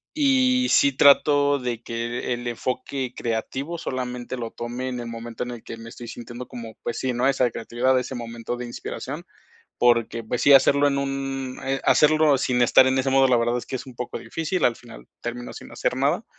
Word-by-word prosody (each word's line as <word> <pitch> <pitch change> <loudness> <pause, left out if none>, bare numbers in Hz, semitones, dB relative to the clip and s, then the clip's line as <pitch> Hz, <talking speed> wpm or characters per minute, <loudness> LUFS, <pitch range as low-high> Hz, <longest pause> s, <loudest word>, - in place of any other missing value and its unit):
y 260 -3 +3
sí 140 -2 +4
trato 145 0 +5
de 120 -2 -4
que 120 +2 -3
el 120 0 -5
enfoque 125 +2 -3
creativo 130 +8 -3
solamente 125 -4 -4
lo 115 -2 -4
tome 120 +3 -5
en 125 -1 -4
el 120 - -5
momento 115 0 -6
en 125 - -6
el 120 -2 -9
que 115 - -8
me 115 0 -10
estoy 120 +1 -10
sintiendo 120 +1 -8
como 115 -2 -8
pues 120 - -4
sí, 130 -1 -1
¿no? 125 +2 +1
Esa 130 -3 +2
creatividad, 125 +3 +1
ese 130 +1 -5
momento 115 0 -5
de 125 - -5
inspiración. 120 - -6 0.6
Porque 115 -1 +2
pues 120 +2 -2
sí 140 - +6
hacerlo 140 +1 +6
en 140 0 0
un 135 -1 -3
eh, 135 0 -1
hacerlo 155 -1 +5
sin 125 -1 0
estar 125 +2 +6
en 130 0 +1
ese 135 +1 +1
modo, 135 0 +5
la 125 - +4
verdad 120 +1 +1
es 120 - -4
que 130 - -4
es 130 - -8
un 130 - -11
poco 125 0 -5
difícil, 165 +3 -2
al 120 - +4
final 120 -2 -13
termino 120 +1 -5
sin - - -11
hacer - - -1
nada, - - +1
125 Hz, 210 wpm, -24 LUFS, 120-135 Hz, 0.6 s, sí